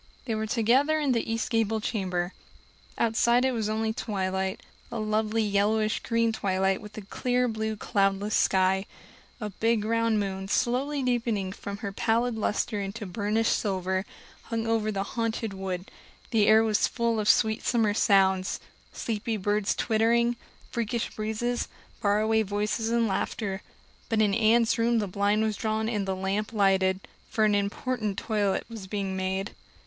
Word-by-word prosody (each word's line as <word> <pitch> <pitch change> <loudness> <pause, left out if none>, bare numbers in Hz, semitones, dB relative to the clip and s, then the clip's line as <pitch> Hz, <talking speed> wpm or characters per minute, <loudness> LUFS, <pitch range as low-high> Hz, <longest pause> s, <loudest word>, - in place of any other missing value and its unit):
They 230 - -2
were 220 0 -2
together 255 +7 +3
in 290 -3 +1
the 230 -2 0
east 230 +2 -2
gable 225 -1 +1
chamber; 185 -5 -2 0.6
outside 235 +2 +3
it 260 - +2
was 220 -4 -1
only 220 0 0
twilight 190 -4 -2 0.3
a 235 - -3
lovely 215 +1 0
yellowish 215 +1 +1
green 230 -1 +1
twilight 190 -2 0
with 210 0 -11
a 215 - -6
clear 250 +5 0
blue 220 -1 -2
cloudless 200 0 0
sky. 190 +1 +2 0.5
A 210 -3 -4
big 225 +1 +1
round 230 -1 +2
moon, 195 -1 -3
slowly 265 +7 0
deepening 230 -6 0
from 200 +1 -6
her 200 - -2
pallid 235 +4 +1
luster 215 -1 -1
into 200 +3 -5
burnished 210 +4 +1
silver, 190 -2 -1 0.4
hung 225 -1 -2
over 225 -1 +1
the 195 -1 -1
Haunted 225 0 -2
Wood; 190 -1 -5 0.4
the 215 -3 +3
air 220 +1 +7
was 220 -1 +2
full 235 -2 0
of 210 - +1
sweet 220 0 +3
summer 225 -4 +2
sounds 190 -3 +3 0.3
sleepy 220 0 -3
birds 205 +1 0
twittering, 235 +2 +2 0.4
freakish 235 0 -2
breezes, 220 +3 -2 0.3
faraway 215 +1 +3
voices 210 +2 -1
and 235 -1 +2
laughter. 195 0 -2 0.5
But 225 -2 +1
in 205 -2 +2
Anne's 230 +1 +3
room 235 +1 +3
the 215 - +1
blind 205 +3 +1
was 215 -2 -1
drawn 220 0 -1
and 210 -4 -1
the 190 - 0
lamp 195 +4 -2
lighted, 190 -2 +2 0.3
for 220 - +2
an 210 - +3
important 205 +1 -1
toilet 205 -3 0
was 225 -5 -8
being 195 -1 -3
made. 190 +2 -2
215 Hz, 155 wpm, -27 LUFS, 200-230 Hz, 0.6 s, air